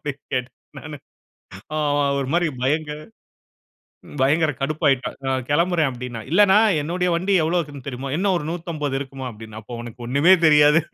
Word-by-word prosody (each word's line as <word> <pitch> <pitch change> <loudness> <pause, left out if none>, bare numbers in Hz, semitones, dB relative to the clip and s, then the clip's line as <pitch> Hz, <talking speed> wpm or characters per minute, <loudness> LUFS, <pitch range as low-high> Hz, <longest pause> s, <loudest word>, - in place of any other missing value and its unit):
அப்பிடீன்னு 145 -2 -5
கேட்டேன், 125 -1 -3 0.2
நானு. - - -8 0.8
அவன் 145 -1 +1
ஒரு 135 - -3
மாதிரி 175 0 +2 0.2
பயங்க 150 +3 0 1.3
பயங்கர 150 +4 +3
கடுப்பாகிட்டான். 140 -2 0
"நான் 130 -1 -1
கிளம்புறேன்." 170 0 +2
அப்பிடீன்னான். 120 -3 -7
இல்லண்ணா, 195 +3 +5 0.2
என்னுடைய 180 +4 -1
வண்டி 185 +4 0
எவ்வளவு 165 +3 +1
இருக்குதுன்னு 145 -4 -9
தெரியுமா?" 135 +1 -5
"என்ன 195 +4 +1
ஒரு 170 - -3
150 165 -5 -3
இருக்குமா?" 135 -1 -7
அப்பிடீன்னான். 110 0 -10
"அப்போ, 120 +3 -9
உனக்கு 120 0 -10
ஒண்ணுமே 140 +8 +4
தெரியாது" 150 +1 +6
145 Hz, 150 wpm, -22 LUFS, 130-165 Hz, 1.3 s, தெரியாது